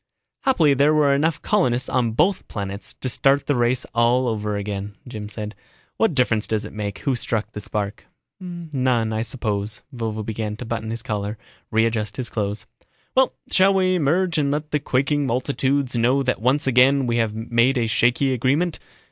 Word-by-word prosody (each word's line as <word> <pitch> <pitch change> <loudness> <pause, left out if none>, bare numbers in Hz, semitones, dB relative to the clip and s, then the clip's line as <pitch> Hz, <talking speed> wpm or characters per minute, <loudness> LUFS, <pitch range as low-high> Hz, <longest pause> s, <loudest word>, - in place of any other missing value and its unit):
"Happily 165 - +4
there 145 +3 +3
were 145 -2 +4
enough 150 +1 0
colonists 130 - +1
on 120 -3 0
both 185 - +1
planets 100 -1 -6
to - - 0
start 135 +3 +2
the 145 - +1
race 120 +1 +1
all 120 +2 +3
over 105 -2 -1
again," 100 0 -4
Jim 105 -3 -6
said. 105 0 -6 0.4
"What 225 -9 +2
difference 115 -5 +2
does 110 -1 -1
it - - -9
make, 100 -2 -4
who 135 - -1
struck 115 -2 -2
the 105 - -6
spark?" 105 0 -3 0.3
"None, 135 - -1
I 110 - -1
suppose." 105 -3 -3
Vovo 110 -3 -3
began 105 -1 -4
to 125 - -7
button 110 -1 -3
his 115 0 -4
collar, 105 0 -3 0.3
readjust 110 -2 0
his 130 -2 -3
clothes. 105 -1 -3 0.5
"Well, 260 0 +3 0.2
shall 195 +1 +4
we 185 -1 +3
emerge 170 +1 +1
and 140 -1 +1
let 150 +1 -2
the 150 - +1
quaking 140 +1 0
multitudes 130 +1 0
know 125 +4 +2
that 125 -4 -1
once 130 +5 +2
again 135 +1 +4
we 120 -1 0
have 110 -2 0
made 120 +4 +2
a 120 - +1
shaky 120 +4 +2
agreement? 140 +8 +1
120 Hz, 180 wpm, -22 LUFS, 110-140 Hz, 0.5 s, Happily